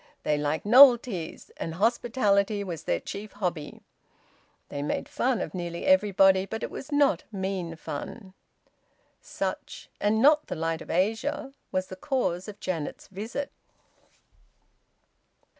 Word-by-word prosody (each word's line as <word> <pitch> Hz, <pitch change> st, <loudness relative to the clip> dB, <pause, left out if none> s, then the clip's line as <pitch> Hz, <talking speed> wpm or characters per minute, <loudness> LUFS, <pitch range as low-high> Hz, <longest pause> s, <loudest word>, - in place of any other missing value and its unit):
They 150 Hz, -, +2 dB
liked 150 Hz, +3 st, -1 dB
novelties, 240 Hz, -, +5 dB
and 165 Hz, -, -4 dB
hospitality 210 Hz, -1 st, +1 dB
was 170 Hz, -5 st, -6 dB
their -, -, +1 dB
chief 205 Hz, +1 st, -7 dB
hobby. 175 Hz, -7 st, -4 dB, 0.9 s
They 145 Hz, -, -4 dB
made 145 Hz, -, -2 dB
fun 250 Hz, -2 st, 0 dB
of -, -, -4 dB
nearly 170 Hz, -2 st, -4 dB
every 280 Hz, -7 st, +4 dB
body, 190 Hz, 0 st, +5 dB
but 220 Hz, +2 st, -5 dB
it -, -, -4 dB
was 270 Hz, -, -8 dB
not 290 Hz, -1 st, +3 dB
mean 190 Hz, -4 st, -3 dB
fun. 185 Hz, +6 st, -7 dB, 0.9 s
Such, -, -, -5 dB
and 210 Hz, +1 st, +2 dB
not 300 Hz, +5 st, +5 dB
"The -, -, -4 dB
Light 165 Hz, 0 st, -2 dB
of -, -, -11 dB
Asia," 225 Hz, -, -1 dB, 0.2 s
was 185 Hz, 0 st, 0 dB
the 185 Hz, -, -9 dB
cause 190 Hz, -, -1 dB
of 205 Hz, -1 st, -9 dB
Janet's 165 Hz, -5 st, -4 dB
visit. 220 Hz, +8 st, -5 dB
195 Hz, 135 wpm, -27 LUFS, 175-235 Hz, 0.9 s, novelties